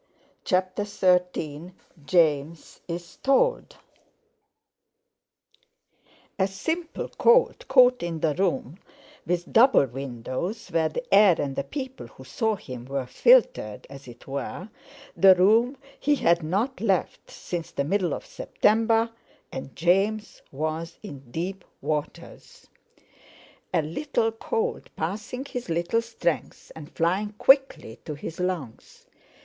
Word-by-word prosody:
CHAPTER 185 +1 0
XIII 180 -4 0 0.3
JAMES 155 -2 +1
IS 170 0 -7
TOLD 485 - +1 2.6
A 190 - +3
simple 320 - -4
cold, - - +4
caught 250 -1 +5
in 170 -2 -3
the 155 -2 +2
room 180 -2 -1 0.5
with 175 +1 -2
double 235 - +6
windows, 135 - -5
where 160 -1 +1
the 245 - -4
air 195 -4 +6
and 140 -2 -2
the - - -1
people 265 -2 -7
who 130 - -15
saw 220 - -1
him 125 -10 -9
were 135 0 -3
filtered, 125 - +3
as 140 -1 -11
it 120 0 -13
were, 140 +8 -5 0.5
the 190 -1 +7
room 225 +8 +3 0.2
he 295 0 +2
had 170 -9 +2
not 200 - -2
left 195 -5 -1
since 170 -2 -6
the 140 - -2
middle 180 +3 0
of - - -9
September—and 225 - -1
James 195 +5 +1
was 155 +4 -4
in 135 -3 -10
deep 180 +7 -4 0.2
waters. 150 0 -5 1.1
A 160 - +1
little 225 - -1
cold, 455 - -3
passing 215 - -4
his 250 -7 -6
little 170 +7 0
strength 225 -8 -3
and 155 0 -10
flying 190 +5 0
quickly 265 - +3
to 150 - -6
his 160 +4 -8
lungs. 180 -11 -5
180 Hz, 120 wpm, -25 LUFS, 155-225 Hz, 2.6 s, the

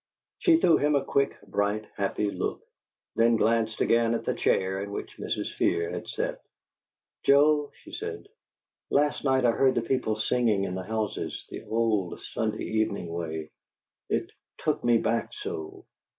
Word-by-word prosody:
She 340 -3 +5
threw 170 - +5
him 150 0 +2
a 140 -1 +1
quick, 140 0 +1
bright, 105 +1 -1
happy 100 +1 -1
look, - - -3 0.5
then 115 0 +4
glanced 110 0 +1
again 115 0 +3
at - - -4
the - - +1
chair 95 +1 +1
in 100 - -5
which 100 - -6
Mrs. - - -3
Fear 85 0 +1
had - - -5
sat. - - -3 0.8
"Joe," 145 +1 +4
she 320 - -12
said, 435 +3 -6 0.6
"last 145 +1 +2
night 130 -2 +3
I 120 - +6
heard 130 +2 +3
the 120 - +2
people 115 -3 0
singing 110 -2 +1
in 95 - -2
the 95 - -3
houses, 110 -2 -3
the - - -6
old 110 -5 0
Sunday 110 -1 -2
evening 110 -5 -1
way. 80 -2 -4 0.6
It - - -1 0.3
'took - - -1
me 120 -1 +5
back 115 +1 -1
so'!" 395 -3 -6
115 Hz, 160 wpm, -27 LUFS, 105-140 Hz, 0.8 s, I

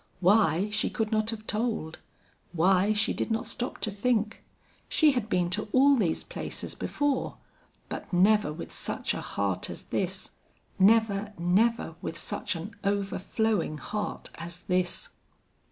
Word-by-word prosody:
Why, 195 0 +4
she 210 - +1
could 220 -1 -2
not 215 0 +1
have 220 -1 -3
told; 215 -8 -2 0.5
why, 185 +4 +4
she 215 0 +2
did - - -2
not 225 0 0
stop 245 - -3
to 215 - +1
think. 215 +1 0 0.5
She 310 -2 +5
had 245 -5 -2
been 175 -3 +1
to 210 +4 +1
all 275 +2 +6
these 185 -10 0
places - - -6
before, 290 -3 -1 0.5
but - - -6
never 195 -1 +4
with 155 +3 -7
such - - -2
a - - -4
heart 100 -2 -1
as - - -7
this - - -3 0.5
never, 210 0 +4
never 200 +8 +2
with - - -4
such - - -3
an 170 +6 -6
overflowing 200 -2 0
heart 210 +5 -4
as 170 +1 -7
this. 180 -2 -1
210 Hz, 145 wpm, -28 LUFS, 180-225 Hz, 0.5 s, all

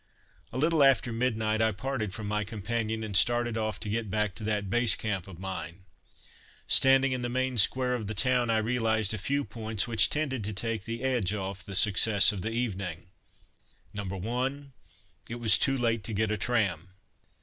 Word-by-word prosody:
A 125 - -6
little 155 +2 +2
after 130 -3 +3
midnight 110 -2 0
I 110 0 +3
parted 110 -1 -4
from 105 +3 -6
my 105 0 -1
companion 110 +1 -3
and 105 -3 -4
started 120 +3 +4
off 110 -1 -2
to 110 - -5
get 110 0 -2
back 105 0 -1
to 110 - -8
that 105 -2 -1
Base 120 +3 +3
Camp 100 -5 -4
of 95 -4 -11
mine. 95 -1 -7 0.8
Standing 135 0 +4
in 130 -1 -2
the 120 - -3
main 130 +1 -1
square 125 +5 +2
of 115 -4 -3
the 105 - -5
town, 125 +2 +2
I 115 - +2
realized 110 -2 0
a 110 - -4
few 140 +8 -1
points 110 0 -3
which 115 -3 +3
tended 135 -6 -2
to 105 - -4
take 110 0 -3
the 115 +2 -5
edge 120 -7 0
off 95 -2 -5
the 95 - -6
success 105 0 +5
of 100 -3 -6
the 110 - -3
evening: 95 -8 -4 0.8
No. 105 - -5
1. 125 +9 -4 0.6
It 115 - -4
was 115 -4 +4
too 135 0 +3
late 115 -3 0
to 115 - -5
get 105 +1 0
a 105 - -1
tram. 95 -6 -1
110 Hz, 195 wpm, -28 LUFS, 100-120 Hz, 0.8 s, success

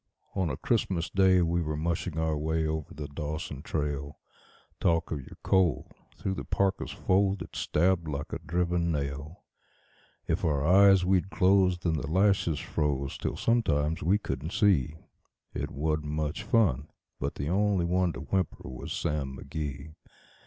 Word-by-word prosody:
On 95 -4 0
a - - -3
Christmas 95 -7 0
Day 95 -2 +4
we 85 +1 +1
were 75 -2 -2
mushing 85 +1 -2
our 80 -1 +1
way 80 +2 0
over 80 -1 -3
the 75 -1 -6
Dawson 75 -1 -5
trail. 75 -2 -3 0.6
Talk 85 -1 +1
of 75 - -2
your 65 - -12
cold! 90 -8 +2 0.3
through 95 - -2
the - - -5
parka's 95 -1 0
fold 95 0 +1
it - - -13
stabbed 85 +1 +1
like 70 -2 -4
a - - -3
driven 85 +1 0
nail. 75 +2 -4 0.8
If - - -1
our 75 -3 +1
eyes 95 +1 +6
we'd 95 0 +2
close, 95 -1 +3
then 85 -2 -1
the 70 - -3
lashes 95 -3 +2
froze 70 -3 -2
till - - -3
sometimes 80 -10 +1
we 95 +6 +3
couldn't 85 -5 -4
see; 95 - +3 0.6
It - - -3
wasn't 75 +1 -1
much 75 0 -2
fun, 80 - +2 0.3
but - - -3
the 70 - -3
only 100 -1 +2
one 90 0 +2
to 65 - -7
whimper 90 0 -2
was 65 -1 -7
Sam 70 -5 -2
McGee. 75 0 -5
80 Hz, 160 wpm, -29 LUFS, 75-95 Hz, 0.8 s, eyes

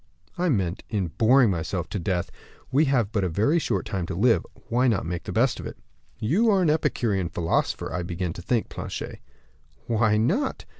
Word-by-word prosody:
"I 180 0 0
mean 95 - 0
in 95 -5 -1
boring 115 - +4
myself 85 +1 -2
to 100 - -3
death. 90 0 -2 0.4
We 145 +4 +4
have 125 -7 +1
but 105 -3 0
a 90 - 0
very 110 - +2
short 100 - -1
time 95 -4 -3
to 95 - -4
live 110 -1 +3 0.2
why 125 +2 +2
not 110 -9 +1
make 85 +1 -4
the - - -4
best - - +2
of - - -5
it?" - - -9 0.4
"You 190 - +2
are 195 -3 +4
an 155 - +4
Epicurean 105 - 0
philosopher, 85 -2 -1
I 90 - -1
begin 85 0 -3
to 90 - -8
think, 110 +6 0
Planchet." - - -6 0.7
"Why 110 -2 +2
not? 195 - 0
105 Hz, 195 wpm, -25 LUFS, 90-130 Hz, 0.7 s, boring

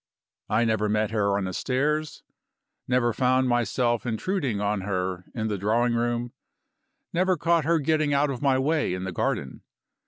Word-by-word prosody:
I 115 +2 +2
never 110 -2 +1
met 105 0 0
her 100 -3 +1
on 100 - -1
the 95 0 -3
stairs, 145 - -1 0.6
never 120 -2 +2
found 130 +2 +2
myself 120 -1 +1
intruding 125 - -1
on 105 -1 0
her 95 -2 -3
in 110 -2 -1
the 105 -3 -2
drawing 115 +5 +1
room, 120 0 -1 0.8
never 185 +1 +2
caught 165 -1 +2
her 165 +1 +3
getting 155 0 +1
out 140 0 +2
of 130 - -5
my 135 -2 +3
way 145 - +1
in 90 - -5
the 95 - -3
garden. 70 -6 -2
120 Hz, 165 wpm, -26 LUFS, 105-140 Hz, 0.8 s, her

